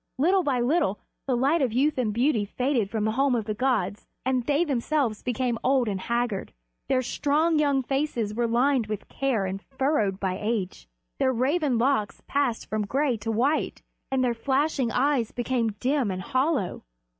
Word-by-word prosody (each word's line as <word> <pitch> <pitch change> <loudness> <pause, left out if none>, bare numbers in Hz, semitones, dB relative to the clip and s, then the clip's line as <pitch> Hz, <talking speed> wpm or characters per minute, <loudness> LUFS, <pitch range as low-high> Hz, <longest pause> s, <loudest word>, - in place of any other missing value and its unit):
Little 365 +8 +3
by 275 -7 0
little 245 - +1 0.3
the 255 -2 +1
light 285 +6 +2
of 255 -4 +1
youth 275 +3 +2
and 225 -4 +1
beauty 235 0 +2
faded 245 0 -1
from 215 0 -1
the 220 - +1
home 270 +2 +2
of 225 -3 -1
the 215 - -2
gods, 210 -5 -1 0.2
and 255 -1 +1
they 295 +3 +3
themselves 275 -5 0
became 245 -1 -1
old 260 -2 +3
and 195 -3 -2
haggard. 235 -3 -2 0.4
Their 255 -1 +2
strong, 305 +5 +1
young 280 -3 +2
faces 260 -6 -1
were 235 +2 0
lined 245 0 +2
with 215 -2 -5
care 255 -8 0
and 190 +1 -4
furrowed 265 -8 0
by 190 -1 -2
age, 210 - -2 0.3
their 260 - +3
raven 265 +2 +1
locks 235 -3 0
passed 275 -5 -1
from 215 -1 -2
gray 270 +2 +1
to 220 +2 -3
white, 265 +8 0 0.3
and 265 -1 +1
their 245 -1 +2
flashing 265 +1 0
eyes 260 -2 +1
became 240 -2 -1
dim 255 +2 0
and 185 -1 -3
hollow. 265 - 0
250 Hz, 180 wpm, -26 LUFS, 220-280 Hz, 0.4 s, Little